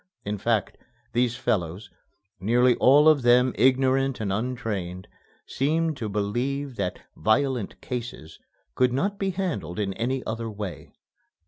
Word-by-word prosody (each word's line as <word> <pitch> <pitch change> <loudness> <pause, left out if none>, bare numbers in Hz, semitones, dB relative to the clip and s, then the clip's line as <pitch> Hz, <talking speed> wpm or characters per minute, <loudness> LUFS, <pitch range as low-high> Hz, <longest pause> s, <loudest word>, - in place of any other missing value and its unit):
In 105 0 -3
fact, 110 -1 0 0.3
these 120 0 +1
fellows 100 -3 -2 0.5
nearly 120 +6 +3
all 145 +4 +6
of 155 -3 +6
them 125 +1 +4
ignorant 130 +2 +2
and 100 -3 -1
untrained 100 -6 -3 0.4
seemed 160 +3 0
to 110 -4 -4
believe 125 +7 -2
that 90 - -3
"violent 120 0 0
cases" 120 -10 -6 0.3
could 125 - +2
not 200 +9 -1
be 195 - 0
handled 165 - -3
in 100 -2 -1
any 125 +5 -2
other 115 0 -3
way. 105 -4 -7
120 Hz, 130 wpm, -25 LUFS, 105-135 Hz, 0.5 s, all